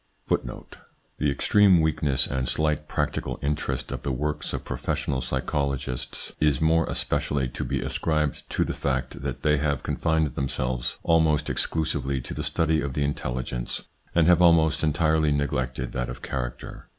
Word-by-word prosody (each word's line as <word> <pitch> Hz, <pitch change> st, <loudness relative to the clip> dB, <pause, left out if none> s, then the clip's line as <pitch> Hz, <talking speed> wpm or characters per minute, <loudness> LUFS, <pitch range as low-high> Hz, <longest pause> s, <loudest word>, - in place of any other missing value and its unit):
1 -, -, +3 dB
1 -, -, -8 dB, 0.6 s
The 75 Hz, -, +2 dB
extreme 95 Hz, +6 st, +5 dB
weakness 75 Hz, -4 st, +2 dB
and 65 Hz, -2 st, -1 dB
slight 75 Hz, -1 st, +1 dB
practical -, -, -2 dB
interest 75 Hz, +1 st, -2 dB
of -, -, -4 dB
the 70 Hz, -, -2 dB
works 75 Hz, +4 st, -2 dB
of -, -, -4 dB
professional 65 Hz, -3 st, -2 dB
psychologists 70 Hz, 0 st, -2 dB
is 75 Hz, -4 st, +3 dB
more 80 Hz, +1 st, +3 dB
especially 70 Hz, -3 st, 0 dB
to -, -, -4 dB
be -, -, -1 dB
ascribed 75 Hz, -3 st, -1 dB
to -, -, +1 dB
the -, -, -2 dB
fact 65 Hz, 0 st, -2 dB
that 70 Hz, -3 st, -4 dB
they 75 Hz, -1 st, +4 dB
have 70 Hz, -2 st, 0 dB
confined 80 Hz, -4 st, 0 dB
themselves 65 Hz, -2 st, -1 dB
almost 80 Hz, -3 st, +3 dB
exclusively 70 Hz, -4 st, 0 dB
to 60 Hz, -, -6 dB
the -, -, -4 dB
study 80 Hz, -1 st, +1 dB
of 70 Hz, -2 st, -3 dB
the 75 Hz, -, +1 dB
intelligence, 65 Hz, -3 st, -3 dB, 0.3 s
and 85 Hz, -2 st, +5 dB
have 90 Hz, 0 st, +5 dB
almost 80 Hz, -3 st, +5 dB
entirely 80 Hz, 0 st, +2 dB
neglected 65 Hz, -3 st, -1 dB
that 60 Hz, -1 st, -2 dB
of 60 Hz, 0 st, -8 dB
charucter. -, -, -5 dB
70 Hz, 160 wpm, -26 LUFS, 65-80 Hz, 0.6 s, extreme